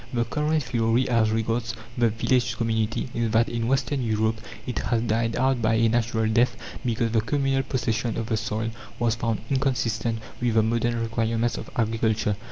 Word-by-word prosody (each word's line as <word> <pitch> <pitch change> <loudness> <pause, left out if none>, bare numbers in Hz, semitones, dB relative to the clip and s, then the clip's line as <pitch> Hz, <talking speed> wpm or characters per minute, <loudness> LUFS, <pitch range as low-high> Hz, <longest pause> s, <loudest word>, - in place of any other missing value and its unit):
The 120 -2 0
current 150 +5 0
theory 120 0 +1
as 115 -3 +3
regards 115 +1 -1 0.2
the 120 -2 +3
village 115 +1 +1
community 110 0 0
is, 115 -1 0
that 115 +1 +4
in 115 -1 -2
Western 135 +1 +1
Europe 110 -1 0 0.2
it 125 - -3
has 115 -1 0
died 115 0 0
out 130 0 +2
by 110 0 +3
a 115 0 +3
natural 115 -1 +1
death, 120 +3 +2 0.3
because 115 -1 0
the 110 -1 +3
communal 135 +2 +1
possession 115 -4 -1
of 115 - -2
the 110 0 0
soil 110 +1 -2 0.3
was 115 -1 +2
found 115 -3 -1
inconsistent 120 -4 0 0.2
with 120 -2 +1
the 110 - +5
modern 115 +1 0
requirements 115 +1 0
of - - -8
agriculture. 110 -2 +1
115 Hz, 175 wpm, -25 LUFS, 110-120 Hz, 0.3 s, the